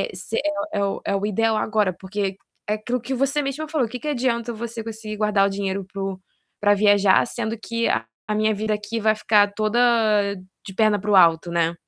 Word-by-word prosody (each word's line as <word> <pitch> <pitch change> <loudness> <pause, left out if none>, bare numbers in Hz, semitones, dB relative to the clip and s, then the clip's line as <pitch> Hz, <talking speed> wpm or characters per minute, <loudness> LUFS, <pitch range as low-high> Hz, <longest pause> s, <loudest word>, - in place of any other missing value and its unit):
Eh, - - -2
se 185 +5 -5 0.4
é 200 - 0
o 195 - -3
é 200 - 0
o 200 +1 -1
ideal 220 +2 +1
agora, 215 -3 +1
porque, 190 +1 -4 0.3
é 210 - +2
aquilo 240 +4 -3
que 250 +4 -6
você 275 +3 +1
mesma 290 +3 -4
falou, 300 -6 0
o 225 - -13
que 250 - -5
que 300 - -5
adianta 240 -4 -1
você 230 +1 -5
conseguir 220 -1 -6
guardar 210 -2 +3
o - - -1
dinheiro 195 -1 -3
para 195 - -5
o 195 -1 -3 0.4
pra 205 0 +4
viajar, 205 -1 +4
sendo 230 -1 -4
que 230 +1 -2
a 115 - 0 0.2
a 210 - +1
minha 215 +1 +2
vida 215 +1 -1
aqui 210 +2 -4
vai 215 0 +3
ficar 205 -1 +3
toda 215 +2 0 0.9
de 195 - -8
perna 215 -1 +2
para 210 +2 -3
o 200 - +5
alto, 170 -1 +5
né. 170 0 +1
215 Hz, 220 wpm, -23 LUFS, 200-230 Hz, 0.9 s, o